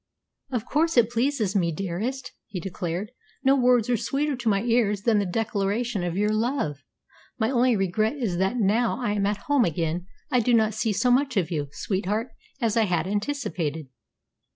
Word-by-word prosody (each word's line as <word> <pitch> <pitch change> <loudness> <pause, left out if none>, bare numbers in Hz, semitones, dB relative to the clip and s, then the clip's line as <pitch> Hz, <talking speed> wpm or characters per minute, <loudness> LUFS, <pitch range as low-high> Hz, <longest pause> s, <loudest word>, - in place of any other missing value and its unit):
"Of 245 -4 -2
course 325 0 +1
it 235 -1 +5
pleases 230 -4 0
me, 170 -4 +2
dearest," 195 - -3 0.2
he 185 - -5
declared. 180 +2 -4 0.3
"No 270 0 +5
words 245 -3 +3
are 245 - +2
sweeter 285 +6 -1
to 240 -2 0
my 200 0 +1
ears 225 -4 +1
than 220 -3 +3
the 200 - 0
declaration 210 +1 -1
of 175 0 -2
your 210 +1 +2
love. 215 - -1 0.6
My 220 +1 +1
only 250 -1 +3
regret 210 +5 0
is 225 -11 -2
that, 190 +6 +1
now 230 +3 +2
I 240 -5 -1
am 200 -1 +1
at 205 0 -2
home 285 -3 +3
again, 170 +1 -1 0.2
I 250 - +4
do 240 +1 +3
not 220 -1 +3
see 220 +1 0
so 245 +5 +2
much 260 -1 +2
of 180 -2 0
you, 150 -3 -1
sweetheart, 205 - -2 0.3
as 230 -4 0
I 225 -1 +4
had 175 -4 0
anticipated." 180 - -2
215 Hz, 185 wpm, -25 LUFS, 190-245 Hz, 0.6 s, it